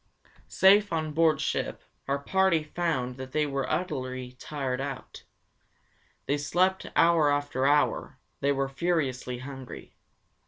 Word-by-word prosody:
'" - - -28
Safe 200 +2 +5
on 155 -2 -2
board 160 -2 +3
ship, - - -2 0.2
our 140 +1 +1
party 170 +2 +2
found 150 -6 -2
that 130 0 -8
they 155 -1 +2
were 140 -2 -2
utterly 130 -7 -3
tired 135 -3 -3
out. 135 -2 -7 1.0
They 145 +1 0
slept 185 +6 +1
hour 165 -3 +4
after 145 -2 0
hour; 145 +1 +1 0.2
they 140 - +1
were 135 -1 0
furiously 135 -5 -1
hungry. 130 0 -9
145 Hz, 130 wpm, -28 LUFS, 135-165 Hz, 1.0 s, Safe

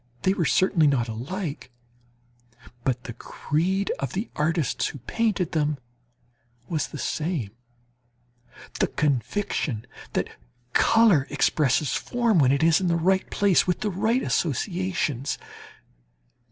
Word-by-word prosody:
They 190 - +3
were 175 -4 0
certainly 175 -3 +3
not 130 -4 +2
alike, 140 - -5 1.1
but 125 -2 -1
the 120 - -7
creed 175 - -1
of 135 -2 -3
the 205 +5 -3
artists 155 -2 0
who - - -7
painted 200 - -1
them 150 -2 0 0.9
was 150 -5 -1
the 150 - -8
same 150 - -2 1.3
the - - +3
conviction 140 - -1 0.3
that - - -3 0.3
colour 210 -12 +5
expresses 145 -1 +2
form 235 -6 +1
when 130 -3 +5
it 140 +3 +2
is 165 +2 +4
in 185 - 0
the 170 - +2
right 190 +3 +1
place 200 -3 +3
with 180 - 0
the 210 - 0
right 225 +7 +1
associations. 170 - -1
160 Hz, 125 wpm, -25 LUFS, 140-190 Hz, 1.3 s, colour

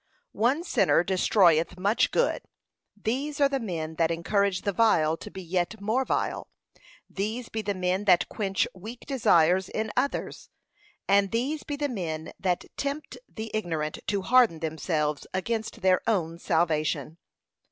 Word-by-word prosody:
One 260 +9 +1
sinner 340 - +3
destroyeth 180 -2 +3
much 200 +5 +2
good; - - +1 0.6
these 275 +8 -2
are 280 - +5
the 275 -1 -1
men 160 -8 -4
that 165 -1 +2
encourage 185 +3 0
the 200 - 0
vile 175 -7 +3
to - - -9
be 190 - -8
yet 180 +4 -2
more 220 +6 0
vile; - - -2 0.6
these 220 +5 -4
be 220 - -3
the 205 -1 -2
men 185 +2 -1
that 180 -3 +4
quench 195 -3 -1
weak 220 +6 -9
desires 185 - +3
in 220 0 -3
others; 270 +3 -2 0.6
and 200 0 +4
these 270 +8 -1
be 290 - -5
the 290 0 -1
men 165 - -4
that 180 -2 0
tempt 285 +2 -4
the 220 0 -7
ignorant 165 -8 -2
to 200 -2 0
harden 245 -8 +4
themselves 155 -2 -2
against 220 +3 -3
their 185 -1 +4
own 170 -7 0
salvation. 160 -3 0
195 Hz, 150 wpm, -27 LUFS, 170-230 Hz, 0.6 s, are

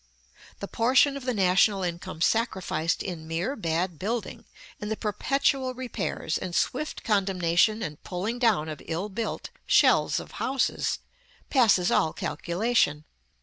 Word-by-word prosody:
The - - -4
portion 260 +4 +3
of 275 -2 -7
the 250 - 0
national 195 +1 +3
income 175 -1 -5
sacrificed 190 -6 0
in 165 -4 -6
mere 170 - -2
bad 170 - -2
building, 225 +5 -3 0.3
in 210 - -5
the 220 - -2
perpetual 260 +4 0
repairs, 245 -9 -3
and 180 -2 -5
swift 305 +4 -1
condemnation 195 0 +2
and 150 -2 -6
pulling 200 +7 -3
down 215 -11 +2
of 155 -2 -6
ill 175 +6 -3
built 220 +3 -4 0.2
shells - - +4
of - - -10
houses, 265 0 0 0.5
passes 215 -9 +4
all 160 - +2
calculation. 170 -5 0
200 Hz, 135 wpm, -27 LUFS, 170-240 Hz, 0.5 s, shells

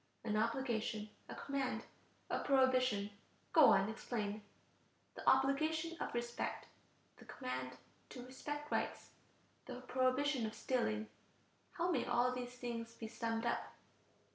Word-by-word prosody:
An 215 -2 0
obligation, 225 -2 0 0.2
a - - -5
command, 275 -2 -2 0.5
a - - +1
prohibition. 255 -6 +3 0.4
Go 315 -4 +9
on, 195 -4 +6
explain. 215 -2 -3 0.7
The - - +2
obligation 310 +5 +3
of - - -2
respect... 240 0 -2 0.5
the - - -14
command 130 0 -4 0.3
to 250 -1 -8
respect 295 +3 -5
rights... - - -1 0.6
the 250 - -6
prohibition 255 0 +2
of 215 - -6
stealing. 220 -4 0 0.7
How 350 +1 +1
may - - +2
all 245 0 +3
these 250 -1 -4
things 230 -2 -4
be 225 - -6
summed 225 0 -2
up? 235 - -1
245 Hz, 125 wpm, -38 LUFS, 220-265 Hz, 0.7 s, Go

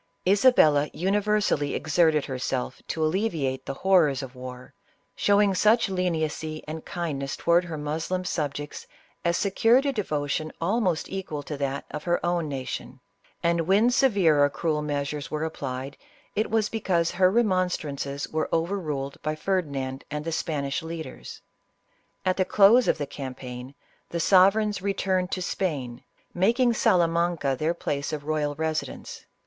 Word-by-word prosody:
Isabella 185 - +5
universally 200 -5 +1
ex 155 - -4
erted 160 -4 +4
herself 130 -1 -3
to 160 -1 -1
alleviate 155 -7 -1
the 135 - -3
horrors 155 -7 +3
of 130 -1 -8
war, 125 0 -9 0.4
showing 205 -1 +3
such 215 +3 +3
leniency 160 -4 -2
and 155 +1 -6
kindness 145 -6 -3
towards 175 +1 +2
her 160 -2 -5
Moslem 160 +5 -3
sub 150 -5 -2
jects, 145 0 -7 0.4
as 170 0 +1
secured 225 +7 +3
a 280 - +1
devotion 155 - -2
almost 185 -2 0
equal 185 -7 -5
to 150 - -5
that 140 0 -2
of 150 - -6
her 175 0 +2
own 175 -3 0
nation; 135 -2 -5 0.4
and 170 -1 +1
when 210 +6 +4
severe 200 - +4
or 145 - +4
cruel 155 0 -1
measures 145 0 -3
were 155 0 -2
applied, 135 -3 -5 0.4
it 215 - 0
was 220 -1 +2
because 180 -7 0
her 185 0 +4
remonstrances 180 -10 0
were 155 0 -2
over 170 +5 0
ruled 140 -5 -4
by 155 0 -2
Ferdinand 145 -7 -2
and 150 +1 -4
the 165 - -2
Spanish 145 -4 -2
leaders. 160 0 -8 0.8
At 185 0 +1
the 190 - +3
close 215 +6 +5
of - - +2
the 145 - -2
campaign, 130 -1 -8 0.3
the 170 - -3
sovereigns 200 +3 +4
returned 190 -2 0
to 185 - -2
Spain, 135 -11 -3 0.3
making 235 +7 +3
Salamanca 170 -7 +2
their 160 +3 0
place 140 -3 -3
of 150 -2 -4
royal 150 -1 -1
resi 160 +1 -1
dence. - - -10
160 Hz, 150 wpm, -26 LUFS, 145-190 Hz, 0.8 s, Isabella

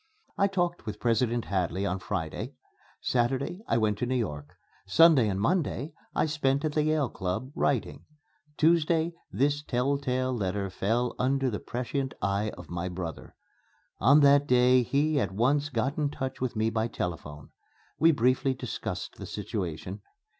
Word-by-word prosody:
I 200 - +3
talked 175 - -1
with 105 -1 -5
President 120 0 +1
Hadley 95 0 -1
on 95 -1 -1
Friday; 80 -4 -4 0.5
Saturday 130 - 0
I - - +2
went 105 -2 +1
to 125 - -1
New 130 - 0
York; 75 - -3 0.3
Sunday 140 - +6
and 95 -1 -1
Monday 155 - 0 0.2
I - - +3
spent 145 -2 0
at 155 - 0
the 150 - +1
Yale 155 -2 +1
Club, 95 +8 -3
writing; 140 -6 -1 0.5
Tuesday, 165 +1 +3 0.2
this 145 +2 +1
telltale 130 -1 0
letter 100 -2 -2
fell 115 +6 0
under 135 0 +1
the 105 - -3
prescient 130 +2 -3
eye 100 +3 0
of 90 -2 -10
my 85 +2 -3
brother. 85 -3 -6 0.6
On 140 +4 +6
that 140 0 +5
day 125 0 +5
he 145 +4 +1
at 100 -8 -1
once 140 +8 +2
got 135 +3 -1
in 145 -1 +1
touch 130 -2 -5
with 130 -3 -2
me 110 +1 +1
by 110 0 0
telephone. 75 -8 -5 0.5
We 165 +1 +6
briefly 130 0 +2
discussed - - -5
the - - -7
situation. - - -4
125 Hz, 155 wpm, -28 LUFS, 105-145 Hz, 0.6 s, Sunday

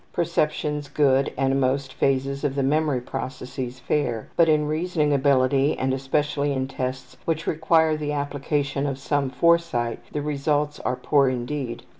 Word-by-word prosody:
Perceptions 150 -3 -1
good 135 -2 +2
and 135 +1 +1
most 130 0 0
phases 135 +1 0
of 140 -2 0
the 140 - 0
memory 145 -1 +1
processes 125 0 -6
fair, 120 -4 -1
but 165 -1 +4
in 150 -1 +3
reasoning 155 -1 0
ability 135 0 +3
and 130 0 0
especially 145 +2 0
in 130 -1 -1
tests 130 -1 -5
which 165 0 -1
require 160 0 +2
the 150 -1 -3
application 145 0 -1
of 135 -2 -3
some 140 0 -1
foresight 140 -5 +1
the 150 - -3
results 150 0 -1
are 125 - -1
poor 140 0 +3
indeed. 125 -1 -4
140 Hz, 150 wpm, -24 LUFS, 130-150 Hz, -, but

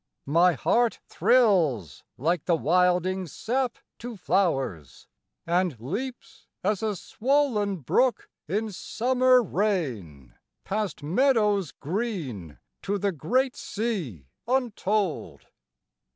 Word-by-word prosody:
My 170 +5 +4
heart 225 - +1
thrills 175 - +2
like 165 +4 0
the 170 - +3
wilding 180 +3 +2
sap 245 - -2 0.2
to 240 -2 -7
flowers, 135 - -1 0.4
And 175 -6 0
leaps 230 - -6 0.2
as 205 +1 0
a 215 -2 -1
swoln 215 - 0
brook 250 - +1 0.2
in 210 +6 -1
summer 255 +5 +2
rain 130 - -2 0.3
Past 200 -7 -3
meadows 210 - +2
green 150 - -4 0.2
to 205 +1 -1
the 200 0 0
great 250 - 0
sea 185 - -4 0.2
untold. 210 - -1
190 Hz, 95 wpm, -26 LUFS, 155-230 Hz, 0.4 s, My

